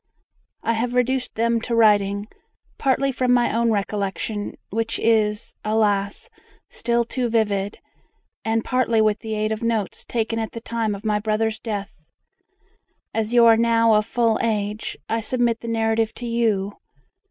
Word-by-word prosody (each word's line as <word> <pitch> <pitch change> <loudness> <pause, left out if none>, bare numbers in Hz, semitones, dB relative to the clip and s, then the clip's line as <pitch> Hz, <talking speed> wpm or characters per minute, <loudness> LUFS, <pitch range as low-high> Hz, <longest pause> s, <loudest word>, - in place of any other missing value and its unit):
I 230 - +1
have 240 +2 -1
reduced 255 +1 0
them 230 0 +1
to 235 +1 -2
writing, 205 -2 +3 0.5
partly 275 0 +2
from 255 -1 0
my 245 -2 +3
own 235 0 +2
recollection, 205 0 -2 0.2
which 225 +2 -1
is, 215 -1 +1
alas! 210 -2 +1 0.4
still 235 0 0
too 245 +1 -2
vivid, 205 -3 0 0.7
and 225 0 0
partly 255 -3 +2
with 215 -1 +2
the 220 -1 -4
aid 215 0 -1
of 220 +1 -2
notes 225 -4 -1
taken 225 -1 -2
at 220 - -4
the 230 - -5
time 230 -2 -2
of 200 +2 -11
my 210 -1 +1
brother's 220 +1 -1
death. 205 -7 -5 1.1
As 220 0 -1
you 235 -1 +7
are 225 -1 +7
now 230 -1 +4
of 210 0 +2
full 230 -1 +1
age, 210 -1 -2
I 225 - 0
submit 235 0 0
the 235 - -8
narrative 225 -1 0
to 245 - -7
you. 220 -4 0
225 Hz, 155 wpm, -23 LUFS, 210-235 Hz, 1.1 s, you